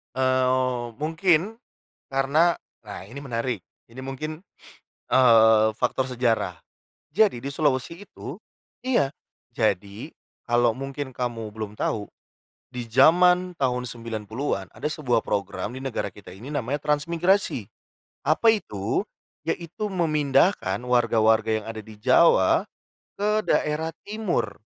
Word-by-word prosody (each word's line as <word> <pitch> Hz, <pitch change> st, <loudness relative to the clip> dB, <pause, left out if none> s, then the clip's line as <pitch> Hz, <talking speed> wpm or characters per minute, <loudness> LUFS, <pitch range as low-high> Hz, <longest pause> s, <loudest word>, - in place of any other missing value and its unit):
Eee, 130 Hz, -1 st, +1 dB
mungkin 170 Hz, +6 st, +1 dB, 0.5 s
karena 140 Hz, +6 st, +2 dB, 0.3 s
nah, 100 Hz, -, -7 dB
ini 120 Hz, +9 st, -9 dB
menarik 120 Hz, -4 st, -3 dB, 0.3 s
ini 130 Hz, -, -10 dB
mungkin, 155 Hz, +6 st, -6 dB, 0.7 s
eee, 110 Hz, -3 st, +6 dB
faktor 130 Hz, +1 st, 0 dB
sejarah. 120 Hz, -2 st, 0 dB, 0.6 s
Jadi 205 Hz, -, +3 dB
di 140 Hz, -, -3 dB
Sulawesi 150 Hz, +6 st, -1 dB
itu -, -, -9 dB, 0.5 s
iya, 145 Hz, -, +2 dB, 0.4 s
jadi 105 Hz, -, -1 dB, 0.4 s
kalau 120 Hz, -1 st, +3 dB
mungkin 135 Hz, +1 st, -6 dB
kamu 115 Hz, -4 st, -4 dB
belum 110 Hz, -2 st, -6 dB
tahu 105 Hz, -2 st, -2 dB, 0.6 s
di 125 Hz, -2 st, -6 dB
zaman 180 Hz, +9 st, +5 dB
tahun 125 Hz, -2 st, 0 dB
90-an 115 Hz, -2 st, -4 dB
ada -, -, -4 dB
sebuah 135 Hz, -7 st, 0 dB
program 105 Hz, +3 st, -3 dB
di 130 Hz, -, -7 dB
negara 130 Hz, -6 st, -2 dB
kita 95 Hz, -2 st, -13 dB
ini 105 Hz, +8 st, -11 dB
namanya 140 Hz, +1 st, -1 dB
transmigrasi. 165 Hz, -, +1 dB, 0.6 s
Apa 225 Hz, -, +4 dB
itu? 100 Hz, -, -2 dB, 0.4 s
Yaitu, 175 Hz, +6 st, -3 dB
memindahkan 155 Hz, -, +2 dB
warga-warga 110 Hz, -3 st, +2 dB
yang -, -, -14 dB
ada 110 Hz, -, -8 dB
di 110 Hz, 0 st, -11 dB
Jawa 130 Hz, -, +4 dB, 0.5 s
ke 210 Hz, +1 st, +1 dB
daerah 155 Hz, +2 st, 0 dB, 0.2 s
Timur. 200 Hz, -, -2 dB
130 Hz, 115 wpm, -25 LUFS, 115-155 Hz, 0.7 s, eee